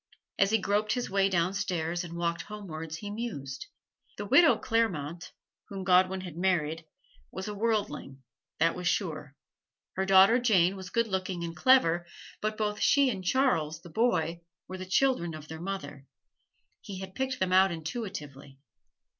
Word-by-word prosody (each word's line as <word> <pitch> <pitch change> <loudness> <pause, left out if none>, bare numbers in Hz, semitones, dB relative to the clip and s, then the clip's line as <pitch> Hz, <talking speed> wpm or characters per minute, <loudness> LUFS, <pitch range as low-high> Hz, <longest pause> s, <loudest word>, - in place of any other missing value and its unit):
As 195 - +4
he 220 - +3
groped 210 +1 0
his 245 -3 -3
way 195 0 +3
downstairs 175 -2 -1
and 170 -1 -7
walked 170 0 -1
homewards 165 -7 -7
he 205 +3 -7
mused. 190 - -5 0.5
The 205 - -4
widow 265 - +6
Clairmont, 175 -9 -1 0.4
whom 195 -1 -6
Godwin 185 +1 +3
had 180 -4 -8
married, 165 -3 0 0.4
was 190 +2 -6
a 210 - -4
worldling, 205 -11 -2 0.3
that 165 +1 +3
was 180 -1 -3
sure; 155 -7 -2 0.6
her 190 - -1
daughter 195 +5 +7
Jane 195 -6 +3
was 190 -1 -8
good 230 +4 +1
looking 185 -3 -3
and 165 0 -5
clever, 175 -8 +4 0.3
but 215 0 -2
both 210 -1 -1
she 280 -2 +4
and 190 -4 -5
Charles, 170 - +1
the 175 - -12
boy, 170 -6 0 0.3
were 185 0 -7
the 185 - -7
children 185 -6 +1
of 155 -1 -10
their 160 +1 -8
mother 145 -8 -6 0.7
he 195 - -8
had 190 0 -8
picked 265 +2 -2
them 185 -1 0
out 190 0 +5
intuitively. 160 - -6
185 Hz, 160 wpm, -29 LUFS, 165-210 Hz, 0.7 s, daughter